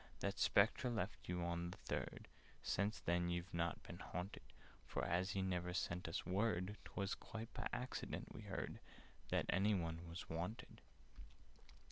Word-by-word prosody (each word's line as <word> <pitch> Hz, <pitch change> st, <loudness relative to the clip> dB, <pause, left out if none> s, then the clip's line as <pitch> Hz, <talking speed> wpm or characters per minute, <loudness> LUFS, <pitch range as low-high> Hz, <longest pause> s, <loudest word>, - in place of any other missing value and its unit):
"That 100 Hz, 0 st, 0 dB
Spectre 110 Hz, +5 st, +5 dB
left 105 Hz, -7 st, -2 dB
you 90 Hz, -1 st, +1 dB
on 85 Hz, 0 st, 0 dB
the 90 Hz, -, -7 dB
Third— -, -, -3 dB, 0.4 s
Since 100 Hz, +2 st, +1 dB
then 85 Hz, 0 st, +3 dB
you've 85 Hz, +1 st, -1 dB
not 85 Hz, 0 st, +1 dB
been -, -, -7 dB
haunted: 90 Hz, +3 st, -3 dB, 0.4 s
For, -, -, -1 dB
as 90 Hz, +3 st, +2 dB
he 95 Hz, -, +2 dB
never 90 Hz, -1 st, 0 dB
sent 90 Hz, 0 st, 0 dB
us 85 Hz, -, -1 dB
word, 95 Hz, +1 st, +2 dB
'Twas 100 Hz, -1 st, -1 dB
quite 115 Hz, +1 st, -5 dB
by -, -, -1 dB
accident 125 Hz, +1 st, -2 dB
we -, -, -6 dB
heard -, -, -3 dB, 0.5 s
That -, -, +3 dB
any 100 Hz, +3 st, +5 dB
one 85 Hz, -1 st, -1 dB
was 85 Hz, +2 st, -5 dB
wanted. 90 Hz, +10 st, -3 dB
90 Hz, 155 wpm, -43 LUFS, 85-100 Hz, 0.5 s, Spectre